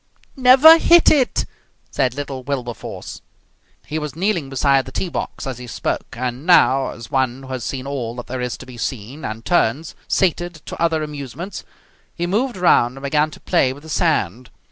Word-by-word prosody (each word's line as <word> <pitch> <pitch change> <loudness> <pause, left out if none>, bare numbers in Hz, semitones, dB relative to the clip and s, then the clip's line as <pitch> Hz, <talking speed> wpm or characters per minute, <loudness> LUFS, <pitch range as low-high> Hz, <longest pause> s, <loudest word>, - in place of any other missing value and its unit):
"Never 270 +6 +8
hit 340 0 +6
it!" 270 -5 +2 0.5
said 125 -1 0
little 140 -2 -5
Wilberforce. 125 -3 -6 0.6
He 155 +1 -3
was 150 -2 -6
kneeling 175 -5 -1
beside 135 0 +2
the - - -8
tee 180 - -3
box - - -5
as 130 -3 -5
he 125 - -9
spoke, 115 - -4
and 125 +2 -3
now, 135 -6 +4
as 115 -2 -10
one 130 0 0
who 130 - -11
has 130 -2 -4
seen 130 +2 -4
all 125 -5 -4
that 120 - -7
there 130 0 -5
is 125 -1 -3
to - - -11
be 125 -2 -11
seen 125 +5 -5
and 110 0 -6
turns, 155 -1 +1
sated, 175 -1 0
to - - -7
other 165 -2 +1
amusements, 150 +5 -7 0.5
he 175 - -2
moved 220 +6 -1
round 135 -8 +3
and 135 - -11
began 150 +2 +1
to - - -13
play 130 -1 +2
with 145 +2 -14
the 160 - -11
sand. 130 - 0
140 Hz, 190 wpm, -20 LUFS, 125-170 Hz, 0.6 s, Never